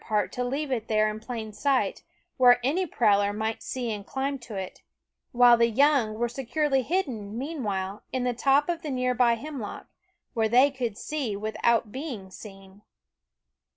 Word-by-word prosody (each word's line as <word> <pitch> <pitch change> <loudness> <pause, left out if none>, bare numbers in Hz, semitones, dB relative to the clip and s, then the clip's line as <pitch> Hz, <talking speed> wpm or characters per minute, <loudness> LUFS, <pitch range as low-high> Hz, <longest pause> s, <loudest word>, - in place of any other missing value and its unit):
Eyed - - -19
part 210 -1 +1
to 250 - -3
leave 275 +3 -2
it 230 -3 -2
there 215 -1 +2
in 215 0 -5
plain 220 -2 -6
sight, 275 +4 0 0.4
where 245 -2 +6
any 345 +8 +1
prowler 205 -7 +2
might 220 +2 -3
see 245 -3 -3
and 205 -1 -5
climb 270 +4 -3
to 235 -3 -9
it; 190 -1 -6 0.5
while 240 -1 +6
the 235 0 +3
young 260 -3 +3
were 240 +2 0
securely 270 +3 0
hidden, 245 - -2
meanwhile, 210 -9 -3
in 255 -1 -1
the 250 0 0
top 275 +4 +3
of 340 -1 -2
the 305 - -5
near 255 -1 0
by 240 -1 +3
hemlock, 255 -2 -7 0.5
where 225 -3 +1
they 255 +5 +5
could 240 -6 -4
see 275 -9 -3
without 220 +1 0
being 250 -9 -6
seen. 195 0 -13
240 Hz, 175 wpm, -27 LUFS, 215-270 Hz, 0.5 s, where